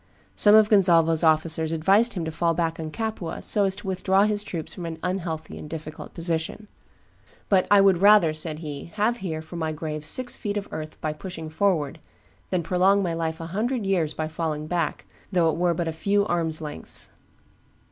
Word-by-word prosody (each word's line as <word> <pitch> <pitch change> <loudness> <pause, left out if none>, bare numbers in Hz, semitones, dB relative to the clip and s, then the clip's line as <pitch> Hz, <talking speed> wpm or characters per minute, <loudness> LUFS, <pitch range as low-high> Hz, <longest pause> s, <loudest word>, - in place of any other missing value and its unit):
Some 210 0 +5
of 215 -1 +7
Gonzalvo's 170 -6 +4
officers 160 0 +2
advised 195 +9 +3
him 175 -4 -3
to 160 - -3
fall 165 +1 0
back 165 -1 -1
on 160 -1 -4
Capua, 220 -2 -4
so 205 -1 +3
as 190 -1 0
to 205 0 -8
withdraw 190 +1 +2
his 210 -1 0
troops 170 -6 -5
from 175 -2 -6
an 165 -1 -5
unhealthy 170 -4 -4
and 150 - -9
difficult 155 -1 -8
position; 170 +5 -3 0.8
but 190 -2 +3
"I 205 -1 +7
would 195 -3 +4
rather," 200 -6 +6
said 155 0 0
he, 150 -3 -7
"have 220 +3 +1
here, 160 -6 -4
for 165 +2 -9
my 160 -1 -2
grave, 155 -1 -5
six 245 +11 +1
feet 205 -1 -3
of 205 - -4
earth 155 0 -7
by 155 -1 -2
pushing 160 -1 -8
forward, 160 -5 0 0.5
than 180 -2 0
prolong 190 +4 +3
my 170 -2 -1
life 160 -1 -3
a 165 - -6
hundred 230 +2 -1
years 175 -6 0
by 155 - -2
falling 155 -1 -3
back, 170 -1 -2 0.3
though 170 -4 +3
it - - -4
were 175 0 +1
but 170 0 -2
a - - -1
few 200 +5 +1
arms' 165 -4 -1
lengths." 150 - -6
170 Hz, 200 wpm, -25 LUFS, 160-195 Hz, 0.8 s, of